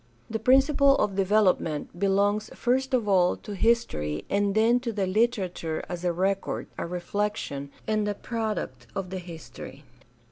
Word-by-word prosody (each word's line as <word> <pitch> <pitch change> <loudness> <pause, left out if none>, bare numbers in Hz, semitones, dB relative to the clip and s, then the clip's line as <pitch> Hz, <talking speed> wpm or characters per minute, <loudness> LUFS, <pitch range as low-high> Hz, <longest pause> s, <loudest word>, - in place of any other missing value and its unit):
The 225 - -1
principle 275 +3 +5
of 210 -6 +1
develop 195 0 +3
ment 155 +2 -5
belongs 200 +2 +1
first 260 +2 +1
of 230 -4 0
all 185 -3 +3
to 210 - -8
history 190 - 0
and 200 0 +1
then 230 +3 +4
to 245 -2 -3
the 200 -3 -1
literature 185 -6 0
as 175 -1 -6
a 175 - +2
record, 190 +3 -1
a - - -4
reflection, 175 -5 -3 0.2
and 215 -1 0
a 205 - -1
product 210 - -4
of 190 -2 -4
the 190 - -3
history. 170 -3 -10
200 Hz, 155 wpm, -27 LUFS, 180-225 Hz, 0.2 s, principle